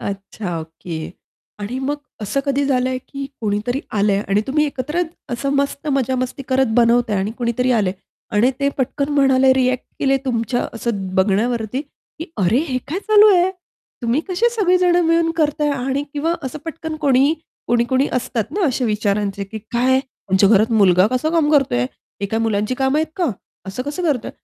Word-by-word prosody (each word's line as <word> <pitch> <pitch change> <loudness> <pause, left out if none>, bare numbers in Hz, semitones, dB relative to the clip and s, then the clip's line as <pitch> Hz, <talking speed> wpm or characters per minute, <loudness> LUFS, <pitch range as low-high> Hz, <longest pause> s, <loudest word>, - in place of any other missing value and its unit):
अच्छा, 195 -2 -5
ओके. 160 0 -7 0.5
आणि 220 +5 -4
मग 275 +2 -1 0.3
असं 210 +7 -1
कधी 280 0 +1
झालंय 255 -1 +1
की 275 -1 -5
कोणीतरी 215 +4 -1 0.2
आलंय 200 -1 +2
आणि 200 +1 +3
तुम्ही 300 +3 +2
एकत्र 295 +5 -2 0.3
असं 250 +3 -2
मस्त 280 +1 -1
मजा 265 -1 +1
मस्ती 255 +2 -3
करत 265 0 +3
बनवताय 235 -2 +3
आणि 195 +2 -1
कुणीतरी 245 +1 0
आलंय 205 -6 +1 0.4
आणि 235 +5 +4
ते 280 - +3
पटकन 275 +2 -1
म्हणाले, 265 -2 +5
रिएक्ट 255 -1 +1
केले 270 -1 +2
तुमच्या 245 -1 -1
असं 200 -5 -3
बघण्यावरती, 220 +5 +1
की 305 +2 -12
"अरे 200 +5 +2
हे 255 -1 0
काय 330 +6 -2
चालू 430 -1 +7
आहे? 360 +1 +3 0.5
तुम्ही 235 +5 +1
कसे 380 +6 +2
सगळे 400 -6 +2
जण 355 -1 +3
मिळून 330 0 +3
करताय?" 295 -2 +1
आणि 270 0 -1
किंवा 320 +3 0
असं 265 +2 -5
पटकन 320 -1 -5
कोणी 280 +1 +4 0.3
कोणी-कोणी 240 +3 +2
असतात 240 -2 -1
ना 395 - +2
अशा 260 -2 0
विचारांचे, 205 -2 -1
की 220 +3 -7
"काय 250 +2 +3
यांच्या 200 -7 +1
घरात 220 +2 +4
मुलगा 190 -4 +5
कसं 255 +7 0
काम 320 -3 +2
करतोय? 270 - +3 0.4
हे 200 - -1
काय 220 +3 -1
मुलांची 215 +1 0
कामं 265 +3 +1
आहेत 315 0 -1
का? 350 -7 +1 0.4
असं 195 +6 -4
कसं 290 +6 -4
करतोय?" 290 -9 0
255 Hz, 170 wpm, -20 LUFS, 215-285 Hz, 0.5 s, चालू